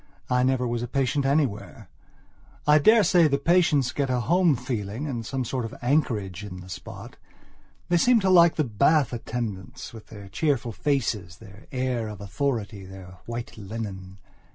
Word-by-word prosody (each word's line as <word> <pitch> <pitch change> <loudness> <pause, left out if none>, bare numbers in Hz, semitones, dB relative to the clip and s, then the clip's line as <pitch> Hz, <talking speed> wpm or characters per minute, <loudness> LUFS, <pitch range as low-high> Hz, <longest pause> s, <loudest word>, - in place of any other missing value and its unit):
I 125 0 +3
never 130 -1 +1
was 120 0 -2
a 120 - -3
patient 135 +2 0
anywhere. 135 -7 -1 0.8
I 150 +1 +6
daresay 180 -2 +5
the 140 -1 +1
patients 150 -4 +3
get 140 -2 -1
a 125 -1 +1
home 170 +3 +3
feeling 120 0 -4
and 125 -6 -4
some 130 +2 -3
sort 125 +1 -2
of 115 - -6
anchorage 110 - 0
in 90 -3 -8
the 90 - -12
spot. 90 - -9 0.7
They 175 - +3
seem 245 +6 +4
to 190 - +1
like 170 -2 +6
the 155 - +1
bath 140 +3 +2
attendants, 115 -6 -5
with 110 -2 -12
their 100 -2 -11
cheerful 125 +2 -1
faces, 105 - -2
their 105 0 -15
air 125 -3 -1
of 105 -2 -8
authority, 100 -1 -3
their 95 -1 -12
white 120 0 -6
linen. 95 -2 -7
125 Hz, 165 wpm, -25 LUFS, 105-145 Hz, 0.8 s, I